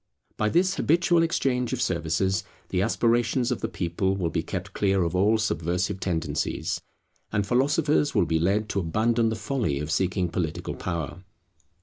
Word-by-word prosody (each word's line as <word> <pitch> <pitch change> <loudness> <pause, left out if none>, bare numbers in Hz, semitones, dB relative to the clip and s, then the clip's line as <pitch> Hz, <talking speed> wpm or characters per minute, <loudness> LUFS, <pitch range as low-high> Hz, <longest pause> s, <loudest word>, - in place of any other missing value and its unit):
By 110 - +1
this 185 - +2
habitual 170 +1 +3
exchange 130 -7 0
of 130 - -2
services 85 0 0 0.3
the 90 - 0
aspirations 120 +3 +1
of 125 - -2
the 115 - -1
people 95 0 -1
will 85 -4 -1
be - - 0
kept 95 +3 -5
clear 95 -2 +2
of 85 +1 -1
all 105 +4 +4
subversive 90 -2 -1
tendencies, 80 -6 -2 0.5
and 105 -1 0
philosophers 145 +5 +2
will - - +4
be 80 -1 +1
led 100 +6 +1
to 100 - 0
abandon 115 +6 +1
the 110 - -1
folly 115 - -1
of 75 +1 -4
seeking 90 +1 +1
political 85 -2 -3
power. 85 -1 -4
95 Hz, 160 wpm, -26 LUFS, 85-120 Hz, 0.5 s, all